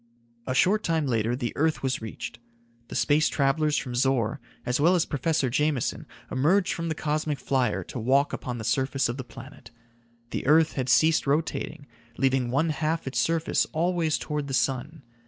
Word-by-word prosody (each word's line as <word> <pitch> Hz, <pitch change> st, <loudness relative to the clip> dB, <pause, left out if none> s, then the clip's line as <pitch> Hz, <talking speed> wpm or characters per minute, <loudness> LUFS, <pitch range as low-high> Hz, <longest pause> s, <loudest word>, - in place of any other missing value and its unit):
A 130 Hz, -, -1 dB
short 200 Hz, +9 st, +3 dB
time 160 Hz, -5 st, 0 dB
later 115 Hz, -2 st, 0 dB
the 120 Hz, -2 st, -3 dB
earth 160 Hz, 0 st, 0 dB
was 130 Hz, -3 st, -1 dB
reached. 110 Hz, +1 st, -7 dB, 0.5 s
The -, -, -8 dB
space 155 Hz, +1 st, +3 dB
travelers 150 Hz, +2 st, +1 dB
from 125 Hz, -, -3 dB
Zor, 125 Hz, 0 st, +1 dB, 0.2 s
as 125 Hz, +2 st, 0 dB
well 170 Hz, +5 st, +4 dB
as 170 Hz, -, +2 dB
Professor 145 Hz, 0 st, 0 dB
Jameson, 145 Hz, +1 st, -1 dB, 0.2 s
emerged 175 Hz, +9 st, +2 dB
from 165 Hz, 0 st, -3 dB
the 160 Hz, -, -2 dB
cosmic 150 Hz, -1 st, -1 dB
flyer 130 Hz, -3 st, 0 dB
to 125 Hz, -, -7 dB
walk 135 Hz, +5 st, +2 dB
upon 125 Hz, -1 st, -4 dB
the 110 Hz, -, -6 dB
surface 135 Hz, +2 st, 0 dB
of 120 Hz, -, -3 dB
the 130 Hz, -, -5 dB
planet. 125 Hz, 0 st, -12 dB, 0.6 s
The -, -, -3 dB
earth 160 Hz, +2 st, +5 dB
had 130 Hz, -2 st, -2 dB
ceased 160 Hz, +3 st, +4 dB
rotating, 150 Hz, 0 st, -1 dB, 0.3 s
leaving 130 Hz, -2 st, +1 dB
one 145 Hz, +6 st, +1 dB
half 155 Hz, +2 st, -1 dB
its 135 Hz, -, -2 dB
surface 165 Hz, -1 st, +1 dB
always 165 Hz, -1 st, +1 dB
toward 150 Hz, -2 st, -3 dB
the 135 Hz, -, -1 dB
sun. 135 Hz, +5 st, -1 dB
140 Hz, 175 wpm, -26 LUFS, 130-160 Hz, 0.6 s, earth